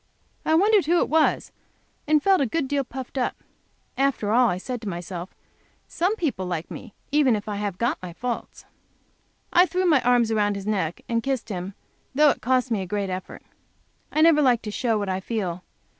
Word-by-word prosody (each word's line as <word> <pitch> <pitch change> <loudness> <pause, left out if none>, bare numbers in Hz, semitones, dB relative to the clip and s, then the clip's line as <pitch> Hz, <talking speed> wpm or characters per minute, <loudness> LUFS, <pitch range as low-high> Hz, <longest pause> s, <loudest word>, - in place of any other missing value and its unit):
I 315 - +2
wondered 405 -1 +4
who 345 +2 +3
it - - +1
was, 315 0 +2 0.6
and 305 -1 +3
felt 385 -4 +4
a 270 - +2
good 285 +4 -1
deal 280 0 0
puffed 260 +1 -6
up. 245 - -2 0.6
"After 270 -7 +1
all," 245 +1 +4
I 180 - -1
said 245 +5 -5
to 215 - -4
myself, 175 0 -6 0.5
"some 365 +6 0
people 255 - -2
like 170 -2 -4
me 230 -6 -9 0.2
if 260 -9 +2
I 205 -1 -3
have 200 -3 -3
got 235 +4 -1
my 180 -1 -7
faults." 240 +7 -5 0.9
I 355 +2 +6
threw 370 +1 -1
my 305 -7 +4
arms 240 -2 +3
around 205 -2 +1
his 200 -1 -6
neck 190 -6 -1
and 230 -1 0
kissed 265 -2 -2
him, 190 0 -5 0.4
though 300 +1 +6
that - - -1
cost 255 0 +1
me 215 -4 +1
a 190 - -5
great 200 0 -2
effort. 185 0 -7 0.7
I 310 - +1
never 320 -2 +6
like 245 -4 +3
to 210 - -5
show 230 0 0
what 205 -1 -2
I 190 0 -1
feel. 185 -4 -3
235 Hz, 200 wpm, -24 LUFS, 200-285 Hz, 0.9 s, I